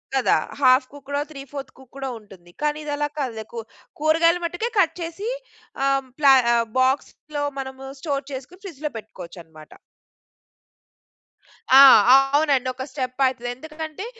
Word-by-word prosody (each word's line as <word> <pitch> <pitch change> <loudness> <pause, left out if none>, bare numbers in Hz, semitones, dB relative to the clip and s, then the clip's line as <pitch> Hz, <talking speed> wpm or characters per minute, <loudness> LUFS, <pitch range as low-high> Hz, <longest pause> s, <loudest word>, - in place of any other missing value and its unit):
కదా! 260 - +3 0.2
Half 255 0 +5
కుక్కుడో, 285 0 -5
three 275 - -9
fourth 275 -2 -7
కుక్కుడో 265 +1 -8
ఉంటుంది. 185 -5 -17
కానీ 300 0 0
ఇదలా 295 0 -1
కాదులే 235 -6 -3
కు 230 - -5 0.4
కూరగాయలు 330 +3 +3
మట్టుకే 350 +8 -3
కట్ 335 - +2
చేసి 340 +7 -5 0.6
ఆహ్, 275 -1 +1
ప్ల 290 - +3 0.5
బాక్స్‌లో 290 +3 -1 0.2
మనము 265 0 -7
స్టోర్ 280 -3 -2
చేసుకొని 275 +8 -9
ఫ్రిడ్జ్‌‌లో 305 -6 -6
పెట్టుకోవచ్చనమాట. 170 -7 -12 2.1
ఆ! 275 - +11 0.5
అవునండి. 280 -4 +2
ఒక 260 - -6
స్టెప్ 260 -1 -4
అయితది. 245 -2 -4
ఎందుకంటే 315 - -8
275 Hz, 125 wpm, -22 LUFS, 255-305 Hz, 2.1 s, ఆ